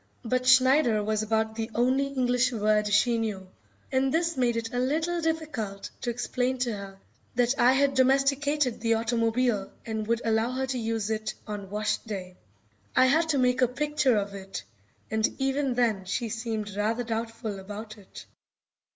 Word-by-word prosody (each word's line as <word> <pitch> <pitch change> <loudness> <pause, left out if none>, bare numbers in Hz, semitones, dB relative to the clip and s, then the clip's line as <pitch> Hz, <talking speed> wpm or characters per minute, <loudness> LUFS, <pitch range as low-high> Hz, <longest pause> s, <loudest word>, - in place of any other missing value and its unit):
But 255 +2 0
"Schneider" 260 -3 +5
was 215 0 0
about 220 0 0
the 225 0 -4
only 260 +3 +2
English 250 -2 +1
word 210 -2 +1
she 230 +3 +3
knew, 205 -4 -3 0.4
and 265 0 +2
this 335 +1 +1
made 240 -2 +1
it 230 0 -4
a 245 - 0
little 320 +7 0
difficult 300 -12 -3
to 245 - -2
explain 250 +2 -1
to 245 -2 -1
her 195 -1 -8 0.4
that 245 +1 +3
I 250 +2 +6
had 275 +1 +3
domesticated 275 0 +2
the 230 0 +2
automobile 230 -2 0
and 220 -1 -3
would 235 0 0
allow 225 +1 +2
her 265 +1 -1
to 260 -1 -3
use 225 -2 -2
it 215 0 -2
on 205 -2 -6
wash 210 +1 0
day. 190 -5 -7 0.6
I 255 - +6
had 320 +5 +3
to 290 - +2
make 250 0 +2
a 250 - +5
picture 270 -1 +1
of 200 -1 -2
it, 195 -1 -7 0.5
and 220 0 +2
even 270 -1 0
then 220 -6 +1
she 230 +5 -2
seemed 220 -2 -4
rather 220 +4 0
doubtful 225 -2 -4
about 210 +3 -8
it. 195 - -12
235 Hz, 170 wpm, -27 LUFS, 215-260 Hz, 0.6 s, I